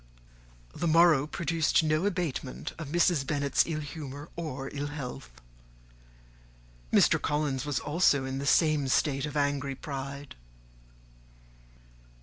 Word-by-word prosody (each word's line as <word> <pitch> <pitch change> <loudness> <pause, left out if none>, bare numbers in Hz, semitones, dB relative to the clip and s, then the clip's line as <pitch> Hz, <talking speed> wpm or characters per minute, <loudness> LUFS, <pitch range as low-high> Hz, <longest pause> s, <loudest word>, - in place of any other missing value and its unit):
The 170 - -2
morrow 160 -3 +5
produced 165 0 +1
no 155 +4 +1
abatement 155 - -3
of 160 - -5
Mrs. 170 -1 +2
Bennet's 140 -1 +1
ill 155 -2 -2
humour 145 0 -8
or 145 -5 -5
ill 145 0 -3
health. 135 -3 -7 1.6
Mr. - - +4
Collins 145 -2 -1
was 145 -5 0
also 145 -3 +2
in 135 0 -3
the 140 - -4
same 155 -2 +3
state 135 +1 +1
of 150 - -5
angry 140 -1 0
pride. 140 0 -6
145 Hz, 120 wpm, -29 LUFS, 135-155 Hz, 1.6 s, morrow